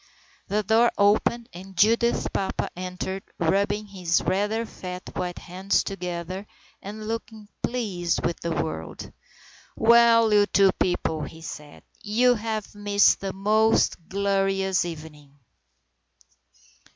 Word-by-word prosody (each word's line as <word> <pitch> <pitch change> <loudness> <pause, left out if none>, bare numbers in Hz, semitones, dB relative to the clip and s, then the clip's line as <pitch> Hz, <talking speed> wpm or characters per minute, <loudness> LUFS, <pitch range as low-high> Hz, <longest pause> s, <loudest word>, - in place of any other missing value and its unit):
The 210 +1 0
door 225 +4 +4
opened 215 +3 +2
and 190 +1 -11
Judith's 230 +4 +3
papa 195 - -2
entered, 185 +1 -5 0.2
rubbing 200 +5 +1
his 180 -4 0
rather 210 +4 0
fat 180 -3 -8
white 180 -1 -3
hands 185 +3 -1
together 180 +1 -5 0.3
and 215 +2 -8
looking 220 -2 -6
pleased 195 -9 -1
with 170 - -1
the 170 - -4
world. 80 - -4 0.6
"Well, 230 -1 +5
you 205 -1 +5
two 195 -2 +4
people," 160 -3 0
he 160 - -11
said. 150 -2 -9 0.2
"You 240 +4 +3
have 220 -2 -4
missed 205 -1 +3
a 195 - -2
most 215 +3 +2
glorious 195 -1 +1
evening." 150 -4 -10
195 Hz, 115 wpm, -25 LUFS, 180-215 Hz, 0.6 s, Well